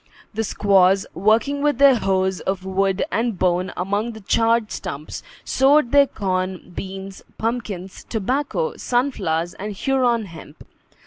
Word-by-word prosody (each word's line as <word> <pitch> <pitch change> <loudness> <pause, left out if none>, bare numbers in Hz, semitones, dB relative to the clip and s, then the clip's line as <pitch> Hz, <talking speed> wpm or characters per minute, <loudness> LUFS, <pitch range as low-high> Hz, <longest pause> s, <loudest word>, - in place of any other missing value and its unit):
The 220 +1 -1
squaws, 195 -2 +3
working 225 +9 +2
with 295 -3 +1
their 280 0 +7
hoes 190 -4 0
of 190 -1 -3
wood 190 0 0
and 230 -3 -1
bone 180 0 +1
among 205 +5 -1
the 220 - -11
charred 225 +2 +1
stumps, 145 +2 -6 0.2
sowed 270 -1 +3
their 280 -1 +6
corn, 185 -4 -3
beans, 195 +1 -7 0.2
pumpkins, 215 -5 -4
tobacco, 280 - -2
sunflowers, 190 - -1
and 210 +1 -6
Huron 240 0 +1
hemp. 160 -4 -12
205 Hz, 130 wpm, -21 LUFS, 190-240 Hz, 0.2 s, their